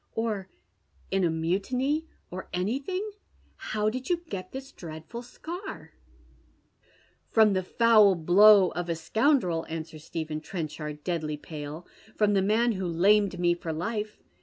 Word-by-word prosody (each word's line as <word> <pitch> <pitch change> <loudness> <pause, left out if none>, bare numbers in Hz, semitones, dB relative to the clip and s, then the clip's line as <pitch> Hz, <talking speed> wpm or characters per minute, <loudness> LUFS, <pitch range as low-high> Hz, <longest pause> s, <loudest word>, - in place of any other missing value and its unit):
" - - -41
Or 215 -4 -2 0.6
in 195 0 +2
a^mutiny 200 - 0
— - - -41
or 185 +1 -7
anything? 270 - -2 0.5
How 215 0 -1
did 255 +5 -5
you 350 - +3
get 185 -1 -5
this 265 0 -7
dread 160 -2 -9
ful 235 0 -6
scar? 345 - -8 0.4
" - - -37
" - - -35
From 220 -2 +5
the 185 - +1
foul 215 0 +5
blow 190 +3 +6
of 175 0 -4
a 165 - 0
scoundrel," 185 - +1
answers 160 -1 -6
Stephen 155 -1 -4
Tren 165 0 -4
ehard, 150 -1 -7
deadly 155 -4 -2
pale. 150 +2 -8 0.2
" 220 - -24
From 210 -1 +3
the 195 - +3
man 220 +5 +3
who 190 -4 -2
lamed 195 +3 +3
me 175 -1 +3
for 170 -1 -5
life. 210 +6 -4
190 Hz, 160 wpm, -28 LUFS, 165-225 Hz, 0.6 s, blow